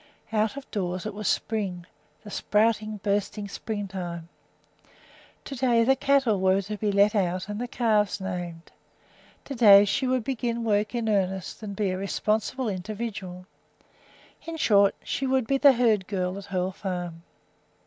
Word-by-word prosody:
Out 215 Hz, +4 st, +1 dB
of 280 Hz, -, -7 dB
doors 185 Hz, -3 st, -3 dB
it 215 Hz, -, -4 dB
was 210 Hz, 0 st, -4 dB
spring, 195 Hz, -6 st, -1 dB, 0.4 s
the 210 Hz, -, -10 dB
sprouting, 215 Hz, 0 st, +1 dB
bursting 205 Hz, 0 st, -1 dB
springtime. 190 Hz, -5 st, -5 dB, 1.2 s
To 275 Hz, -, -6 dB
day 240 Hz, -2 st, +3 dB
the 265 Hz, +3 st, +4 dB
cattle 270 Hz, -6 st, +2 dB
were 190 Hz, +1 st, +3 dB
to 210 Hz, +3 st, -5 dB
be 210 Hz, 0 st, 0 dB
let 200 Hz, +2 st, +4 dB
out 185 Hz, -2 st, 0 dB
and 210 Hz, +2 st, -4 dB
the 245 Hz, -, -3 dB
calves 220 Hz, -4 st, +1 dB
named. 175 Hz, -3 st, -6 dB, 0.7 s
To 280 Hz, -, -6 dB
day 205 Hz, -5 st, +8 dB
she 260 Hz, +6 st, 0 dB
would 255 Hz, -2 st, +1 dB
begin 235 Hz, -2 st, -2 dB
work 210 Hz, +1 st, 0 dB
in 235 Hz, -2 st, -1 dB
earnest 190 Hz, -1 st, -1 dB
and 205 Hz, -2 st, -6 dB
be 200 Hz, -2 st, 0 dB
a 185 Hz, -, -3 dB
responsible 215 Hz, +5 st, -1 dB
individual. 195 Hz, -2 st, -5 dB, 1.0 s
In 330 Hz, 0 st, -5 dB
short, 200 Hz, -8 st, +4 dB
she 270 Hz, -, -2 dB
would 260 Hz, -2 st, +1 dB
be 275 Hz, +3 st, +1 dB
the 280 Hz, -1 st, +7 dB
herd 225 Hz, -6 st, +2 dB
girl 185 Hz, -2 st, -2 dB
at 200 Hz, -, -10 dB
Hoel 185 Hz, -2 st, -2 dB
Farm. 180 Hz, -4 st, -5 dB
210 Hz, 160 wpm, -26 LUFS, 190-230 Hz, 1.2 s, day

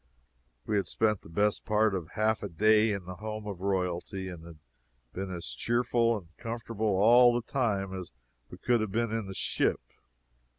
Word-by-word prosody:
We 105 Hz, -, 0 dB
had 100 Hz, -, 0 dB
spent 105 Hz, -3 st, +1 dB
the -, -, -14 dB
best 105 Hz, +5 st, +1 dB
part 105 Hz, 0 st, +2 dB
of 90 Hz, -4 st, -5 dB
half 110 Hz, 0 st, +1 dB
a 100 Hz, -, -4 dB
day 110 Hz, +5 st, +4 dB
in 100 Hz, -3 st, -4 dB
the 90 Hz, 0 st, -8 dB
home 110 Hz, +1 st, -6 dB
of 100 Hz, -4 st, -6 dB
royalty, 95 Hz, 0 st, -2 dB
and 85 Hz, -3 st, -9 dB
had 85 Hz, -1 st, -12 dB, 0.6 s
been 95 Hz, 0 st, -4 dB
as 85 Hz, -9 st, -5 dB
cheerful 120 Hz, -, +1 dB
and 85 Hz, -4 st, -13 dB
comfortable 115 Hz, -1 st, -4 dB
all 120 Hz, +4 st, +6 dB
the 120 Hz, -, -1 dB
time 100 Hz, -8 st, -1 dB
as 90 Hz, -3 st, -6 dB, 0.4 s
we -, -, -10 dB
could 120 Hz, -2 st, +1 dB
have 110 Hz, -3 st, -2 dB
been 115 Hz, +1 st, 0 dB
in 110 Hz, -3 st, -2 dB
the 95 Hz, -, -7 dB
ship. -, -, +1 dB
105 Hz, 185 wpm, -29 LUFS, 95-115 Hz, 0.6 s, all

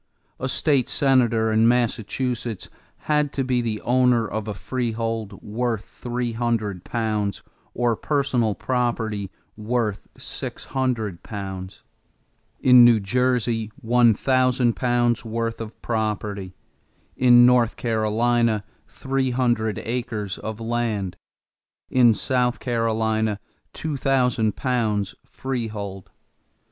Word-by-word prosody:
A 130 Hz, -, -2 dB
state 140 Hz, -2 st, +2 dB
senator 120 Hz, -5 st, +3 dB
in 110 Hz, +1 st, +4 dB
Massachusetts 120 Hz, -1 st, -1 dB, 0.3 s
had 150 Hz, -1 st, +1 dB
to 135 Hz, -, -1 dB
be 125 Hz, -1 st, +1 dB
the 110 Hz, -3 st, -2 dB
owner 125 Hz, -2 st, +3 dB
of 110 Hz, 0 st, -4 dB
a 105 Hz, -, -2 dB
freehold 115 Hz, -4 st, -3 dB
worth 115 Hz, 0 st, -2 dB
three 120 Hz, 0 st, -4 dB
hundred 110 Hz, -5 st, -2 dB
pounds 110 Hz, -3 st, -2 dB, 0.3 s
or 120 Hz, -1 st, +1 dB
personal 125 Hz, -6 st, 0 dB
property 115 Hz, -3 st, -1 dB, 0.3 s
worth 110 Hz, -1 st, -2 dB
six -, -, -6 dB
hundred 115 Hz, -9 st, -2 dB
pounds; 95 Hz, -3 st, -7 dB, 0.8 s
in 125 Hz, -1 st, +7 dB
New 120 Hz, -2 st, +6 dB
Jersey, 115 Hz, 0 st, 0 dB
one 120 Hz, -2 st, +4 dB
thousand 130 Hz, -1 st, +2 dB
pounds' 120 Hz, -1 st, +1 dB
worth 115 Hz, 0 st, -3 dB
of 110 Hz, 0 st, -8 dB
property; 105 Hz, -4 st, -2 dB, 0.6 s
in 120 Hz, -1 st, +7 dB
North 125 Hz, -2 st, +4 dB
Carolina, 115 Hz, 0 st, +1 dB, 0.2 s
three 135 Hz, -1 st, -2 dB
hundred 120 Hz, -4 st, 0 dB
acres 110 Hz, -4 st, -3 dB
of 110 Hz, 0 st, -6 dB
land; 115 Hz, -5 st, -2 dB, 0.8 s
in 120 Hz, -3 st, +5 dB
South 125 Hz, -1 st, 0 dB
Carolina, 110 Hz, -3 st, 0 dB, 0.3 s
two 155 Hz, -3 st, -4 dB
thousand 125 Hz, -5 st, +1 dB
pounds 110 Hz, -6 st, -1 dB
freehold. 105 Hz, -7 st, -5 dB
115 Hz, 110 wpm, -23 LUFS, 110-125 Hz, 0.8 s, in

